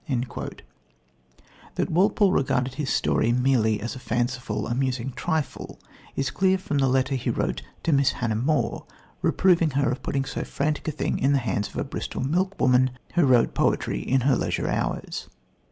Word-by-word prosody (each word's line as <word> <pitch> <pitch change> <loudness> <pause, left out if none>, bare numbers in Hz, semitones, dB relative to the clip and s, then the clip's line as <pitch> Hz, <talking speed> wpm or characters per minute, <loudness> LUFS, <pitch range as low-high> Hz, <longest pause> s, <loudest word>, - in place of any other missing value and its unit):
" - - -36 1.7
That - - -1
Walpole 195 +3 +3
regarded 130 -3 +1
his 145 0 -3
story 115 - +2
merely 120 -4 +2
as 115 +3 -4
a 130 - -8
fanciful, 120 -3 -2
amusing 130 +1 -1
trifle 160 -4 -3 0.4
is 135 - -1
clear 190 0 +2
from 150 -6 -2
the 135 - +3
letter 130 +1 +1
he 130 - -1
wrote - - -1 0.2
to 165 - +2
Miss 140 -1 +3
Hannah 115 -3 -1
More 140 +8 0 0.3
reproving 170 -4 +3
her 140 -3 +2
for 125 - -6
putting 135 -1 -1
so 135 - -4
frantic 150 +2 -2
a - - +1
thing 150 - -2
into 135 +2 +3
the - - +4
hands 100 -1 -1
of - - -10
a - - 0
Bristol - - -4
milkwoman 130 -6 +2 0.2
who 175 -5 +4
wrote 125 -3 +4
poetry - - +1
in 135 0 +1
her 135 +1 +3
leisure - - -1
hours. - - -3
135 Hz, 170 wpm, -25 LUFS, 125-150 Hz, 1.7 s, the